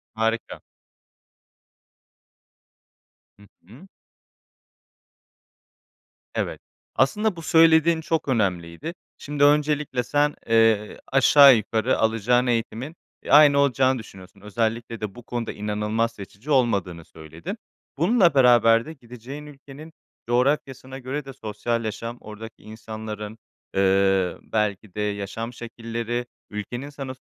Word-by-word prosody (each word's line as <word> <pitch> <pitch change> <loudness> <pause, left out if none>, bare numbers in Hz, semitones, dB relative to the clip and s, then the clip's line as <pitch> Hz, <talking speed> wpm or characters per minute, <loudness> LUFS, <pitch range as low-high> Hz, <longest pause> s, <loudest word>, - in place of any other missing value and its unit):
Harika. 115 +1 -2 2.8
Hı 105 - -19 0.2
hı. 125 - -15 2.5
Evet. - - -3 0.3
Aslında 210 -3 +1
bu 165 - -8
söylediğin 160 0 +4
çok 160 -1 -2
önemliydi. 95 - -2 0.2
Şimdi 145 0 -2
öncelikle 150 -3 +2
sen, 145 +3 +1
eee, 115 -2 +2
aşağı 135 0 +7
yukarı 110 +3 0
alacağın 115 +3 +2
eğitimin, 120 +6 -2 0.3
e, - - -6
aynı 145 -1 +7
olacağını 130 -2 +2
düşünüyorsun. 95 -2 -14
Özellikle 115 +2 -3
de 105 -2 -5
bu 120 - -12
konuda 120 -1 -4
inanılmaz 105 +2 -2
seçici 105 +6 -10
olmadığını 100 - +1
söyledin. 80 +1 -9 0.4
Bununla 175 - +3
beraber 120 -3 +5
de 160 - -8
gideceğin 130 +2 -10
ülkenin 145 +2 -12 0.4
coğrafyasına 130 +1 -1
göre 135 +3 -5
de 135 - -9
sosyal 115 +2 -3
yaşam, 115 +3 -5
oradaki 110 +1 -11
insanların, 110 0 -8 0.4
ııı, 95 -1 +2
belki 105 -2 -2
de 105 - -3
yaşam 105 +3 -4
şekilleri, 115 +1 -5 0.2
ülkenin 120 +6 -6
sana 135 -2 -7
115 Hz, 105 wpm, -24 LUFS, 105-140 Hz, 2.8 s, aşağı